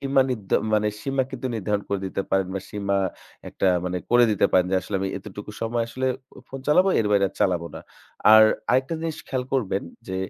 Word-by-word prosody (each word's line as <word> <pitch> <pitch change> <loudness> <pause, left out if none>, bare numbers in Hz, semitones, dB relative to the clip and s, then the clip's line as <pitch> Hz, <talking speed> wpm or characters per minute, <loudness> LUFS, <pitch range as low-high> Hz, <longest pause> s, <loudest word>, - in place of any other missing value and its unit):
সীমা 135 -1 +3
নির্ধ 105 -6 -5 0.8
কিন্তু 130 -1 -5
নির্ধারণ 105 -1 -1
করে 100 -1 -1
দিতে 95 +1 -3
পারেন 95 -1 +2
বা 95 - -2
সীমা 100 -1 -1 0.5
একটা 95 - 0 0.2
মানে 90 0 -2
করে 120 0 +6
দিতে 105 - +3
পারেন 90 -1 +4
যে 95 - +2
আসলে 100 - -3
আমি 95 - -1
এতটুকু 105 +1 -9
সময় 115 +1 0
আসলে 130 +2 -3 0.3
অ - - -11
phone 135 0 -8
চালাবো, 180 +6 +5
এর 110 - 0
বাইরে 100 -1 +4
আর - - -21
চালাবো 85 -3 +1
না। - - -7 0.5
আর 110 0 +9 0.3
আরেকটা 130 +6 +1
জিনিস 165 -1 -4
খেয়াল 130 -1 -2
করবেন 105 -7 0 0.3
যে 95 - -3
105 Hz, 200 wpm, -24 LUFS, 95-130 Hz, 0.8 s, আর